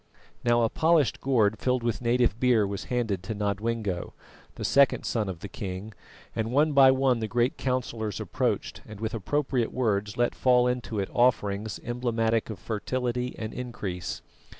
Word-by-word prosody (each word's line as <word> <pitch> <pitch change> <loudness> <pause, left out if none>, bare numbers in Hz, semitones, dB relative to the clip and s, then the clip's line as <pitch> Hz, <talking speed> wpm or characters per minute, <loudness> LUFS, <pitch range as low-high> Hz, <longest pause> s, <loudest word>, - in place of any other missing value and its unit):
Now 120 -1 +3
a 115 - +2
polished 160 -4 +2
gourd 110 -6 +2
filled 125 -1 0
with 120 0 -1
native 120 -2 +2
beer 120 -5 +4
was 100 0 -4
handed 115 -7 -1
to 100 +4 -5
Nodwengo, 105 -2 -2 0.4
the - - -4
second 140 -3 +4
son 110 -4 -1
of 85 -3 -6
the - - -5
king, 100 0 -6 0.4
and 110 0 -1
one 150 +3 +3
by 135 -1 +8
one 130 -2 +3
the 110 - -2
great 120 +7 +1
councillors 115 - -2
approached, - - -2
and, 105 -2 -10
with 110 +2 -3
appropriate 125 +2 -1
words, 105 -4 -1
let 120 0 +2
fall 125 -1 +3
into 125 -3 -2
it 100 -1 -1
offerings 110 -4 +1
emblematic 115 -2 0
of 110 - -5
fertility 125 +3 -2
and 110 0 -5
increase. 110 -8 -5
115 Hz, 165 wpm, -27 LUFS, 105-125 Hz, 0.4 s, by